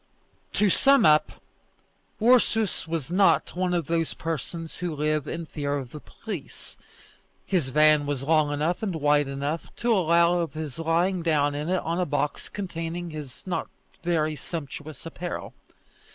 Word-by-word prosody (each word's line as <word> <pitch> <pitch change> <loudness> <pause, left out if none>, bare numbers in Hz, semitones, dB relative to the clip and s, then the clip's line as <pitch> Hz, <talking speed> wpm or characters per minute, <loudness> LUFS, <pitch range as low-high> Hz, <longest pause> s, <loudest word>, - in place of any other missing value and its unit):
To 210 - +3
sum 275 0 +5
up, 150 -2 +5 0.9
Ursus 225 -5 +3
was 160 -2 -3
not 180 -3 +3
one 180 0 0
of 175 -3 0
those 165 +1 -1
persons 165 +1 -5
who 175 -3 -3
live 150 0 0
in 170 - -4
fear 145 -2 -2
of 130 -3 -6
the 150 - -8
police. 195 -1 -8 0.7
His 170 -9 0
van 150 +1 +4
was 140 -2 -2
long 155 0 +3
enough 155 +4 0
and 195 -6 -2
wide 145 -1 +3
enough 140 +4 -3
to 235 0 +1
allow 170 -2 +4
of 170 -2 -2
his 155 -1 -5
lying 170 +3 +1
down 150 -3 +2
in 150 +3 -3
it 185 -1 +1
on 170 +2 -1
a 180 - 0
box 145 0 -2
containing 175 -3 -4
his 145 -4 -8
not 185 - -2 0.3
very 155 -3 0
sumptuous 155 0 -7
apparel. 170 +2 -5
165 Hz, 155 wpm, -26 LUFS, 150-175 Hz, 0.9 s, sum